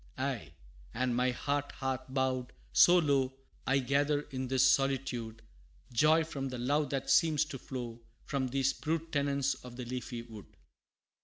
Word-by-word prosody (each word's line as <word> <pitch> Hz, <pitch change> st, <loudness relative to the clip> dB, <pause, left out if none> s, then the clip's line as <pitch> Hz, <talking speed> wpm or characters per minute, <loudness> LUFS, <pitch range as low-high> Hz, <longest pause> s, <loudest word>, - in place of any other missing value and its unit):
Aye, -, -, -3 dB, 0.4 s
and 125 Hz, -1 st, 0 dB
my 125 Hz, +1 st, +2 dB
heart 145 Hz, +3 st, -2 dB
hath 130 Hz, -1 st, -3 dB
bowed 130 Hz, -, -1 dB, 0.2 s
so 175 Hz, -, +7 dB
low, 140 Hz, -5 st, +2 dB, 0.3 s
I 135 Hz, -, +4 dB
gather 140 Hz, +3 st, +1 dB
in 130 Hz, -1 st, -3 dB
this 130 Hz, +1 st, +4 dB
solitude, 130 Hz, -5 st, 0 dB, 0.5 s
Joy 155 Hz, +6 st, +5 dB
from 140 Hz, -4 st, -4 dB
the 130 Hz, -, -5 dB
love 145 Hz, +4 st, +1 dB
that 135 Hz, -1 st, -1 dB
seems 155 Hz, -2 st, +4 dB
to 140 Hz, -3 st, -7 dB
flow 120 Hz, -3 st, -6 dB, 0.2 s
From 135 Hz, -2 st, -1 dB
these 135 Hz, +1 st, +1 dB
brute 165 Hz, +1 st, -3 dB
tenants 140 Hz, -1 st, +1 dB
of 125 Hz, -1 st, -11 dB
the 125 Hz, 0 st, -6 dB
leafy 120 Hz, -1 st, -5 dB
wood. 110 Hz, -4 st, -11 dB
135 Hz, 155 wpm, -32 LUFS, 125-145 Hz, 0.5 s, so